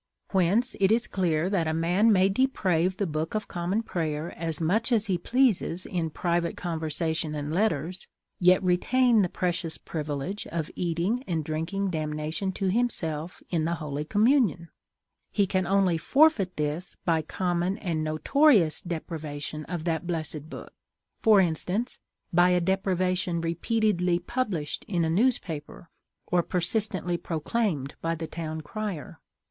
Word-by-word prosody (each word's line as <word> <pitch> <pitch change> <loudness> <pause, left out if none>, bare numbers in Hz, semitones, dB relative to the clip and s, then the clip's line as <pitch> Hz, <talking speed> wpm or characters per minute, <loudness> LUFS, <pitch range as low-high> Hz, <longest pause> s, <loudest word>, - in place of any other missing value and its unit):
Whence 195 +7 +2
it 195 +1 +4
is 230 +2 +3
clear 170 -3 0
that 185 -5 0
a 160 - 0
man 180 +7 +3
may 190 -2 +5
deprave 190 -6 +1
the 200 - 0
Book 155 +2 -3
of 215 - -2
Common 180 +5 -1
Prayer 160 -4 -3
as 165 -2 -3
much 210 +9 +1
as 220 -3 +3
he 185 -4 0
pleases 215 -6 +1
in 170 -3 -2
private 170 +1 -1
conversation 160 -2 -2
and 150 +1 -3
letters, 180 -3 -1 0.3
yet 180 +1 +5
retain 230 +6 +3
the 180 - +1
precious 175 -2 -1
privilege 150 +5 -4
of 165 -2 -4
"eating 180 +8 -1
and 160 -4 -1
drinking 175 +6 -2
damnation 155 +3 -2
to 190 -1 0
himself" 175 -8 -1
in 165 -3 +1
the 170 +1 0
Holy 150 -2 -4
Communion; 210 - +2 0.6
he 205 - +2
can 185 -1 0
only 190 -3 +2
forfeit 245 - +3
this 150 +4 -1
by 165 -2 +2
common 175 +3 -1
and 165 -5 -2
notorious 165 - +3
depravation 155 -3 -5
of 175 -3 -4
that 165 0 -1
blessed 155 -3 -3
book—for 215 +4 -1
instance, 185 +7 0 0.3
by 175 +1 +5
a 180 0 +3
depravation 185 -1 0
repeatedly 180 +1 +1
published 180 - -3
in 175 -4 0
a 160 - 0
newspaper, 170 - -1 0.3
or 180 -1 +2
persistently 180 0 +1
proclaimed 160 - -2
by 165 0 -1
the 165 0 -5
town 160 -1 -5
crier. 200 -3 -5
175 Hz, 140 wpm, -27 LUFS, 160-195 Hz, 0.6 s, may